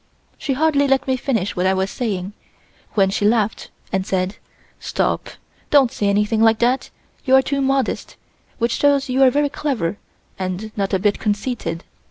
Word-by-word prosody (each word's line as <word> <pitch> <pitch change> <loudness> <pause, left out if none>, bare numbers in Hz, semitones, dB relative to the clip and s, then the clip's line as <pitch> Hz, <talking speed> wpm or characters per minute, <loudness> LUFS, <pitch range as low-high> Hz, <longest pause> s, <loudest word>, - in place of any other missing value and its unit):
She 280 - -1
hardly 285 0 +2
let 270 0 +2
me 260 - +1
finish 225 -7 -1
what 180 +1 +1
I 190 - +2
was 190 +1 -1
saying, 200 -5 -3 0.6
when 195 -2 +3
she 205 - -1
laughed 215 0 +1 0.2
and 190 -1 +1
said: 190 +1 -2 0.4
"Stop! - - -1 0.4
don't 275 -5 +5
say 205 - -1
anything 210 +2 +1
like 225 0 +5
that; 245 +3 +1 0.3
you 265 -1 +4
are 265 - +6
too 280 0 -1
modest, 270 0 -1 0.4
which 235 0 0
shows 285 +1 +2
you 260 +1 +1
are 265 - +7
very 290 +3 +1
clever 235 - -2 0.4
and 190 +3 -4
not 195 -1 0
a - - +3
bit 200 +2 0
conceited. 205 -5 -2
225 Hz, 175 wpm, -20 LUFS, 195-270 Hz, 0.6 s, are